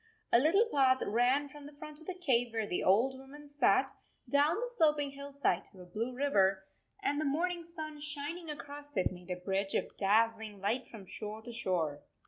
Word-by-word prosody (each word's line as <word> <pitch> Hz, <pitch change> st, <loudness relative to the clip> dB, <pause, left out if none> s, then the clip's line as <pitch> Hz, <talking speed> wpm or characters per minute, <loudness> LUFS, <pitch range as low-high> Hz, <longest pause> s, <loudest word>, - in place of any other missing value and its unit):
A 235 Hz, -, +8 dB
little 350 Hz, -, +4 dB
path 260 Hz, -2 st, +4 dB
ran 250 Hz, +6 st, +2 dB
from 290 Hz, 0 st, -11 dB
the 295 Hz, -, -12 dB
front 300 Hz, 0 st, -9 dB
of 315 Hz, -, -14 dB
the 370 Hz, -, -3 dB
cave 245 Hz, -9 st, +1 dB
where 225 Hz, -1 st, 0 dB
the 180 Hz, -, -2 dB
old 250 Hz, +8 st, +3 dB
woman 290 Hz, +2 st, -12 dB
sat 290 Hz, +1 st, +3 dB, 0.4 s
down 290 Hz, +4 st, +3 dB
the 480 Hz, +4 st, -2 dB
sloping 300 Hz, -6 st, +3 dB
hillside 280 Hz, -8 st, -1 dB
to 185 Hz, -, -14 dB
a -, -, -10 dB
blue 220 Hz, +8 st, -3 dB
river, 195 Hz, -8 st, +2 dB, 0.4 s
and 290 Hz, -6 st, +1 dB
the -, -, 0 dB
morning 340 Hz, +5 st, 0 dB
5 335 Hz, -, -15 dB
sun 310 Hz, -2 st, -6 dB
shining 300 Hz, +3 st, -4 dB
across 290 Hz, -1 st, -7 dB
it 185 Hz, -, +2 dB
made 180 Hz, 0 st, -11 dB
a 180 Hz, -, -1 dB
bridge 195 Hz, +2 st, -1 dB
of -, -, -1 dB
daz 225 Hz, +3 st, +4 dB
zling 210 Hz, -2 st, -8 dB
light 230 Hz, +6 st, -1 dB
from 210 Hz, -4 st, -10 dB
shore 215 Hz, +3 st, -6 dB
to 240 Hz, -, -8 dB
shore. 175 Hz, -10 st, -1 dB
270 Hz, 205 wpm, -33 LUFS, 210-295 Hz, 0.4 s, A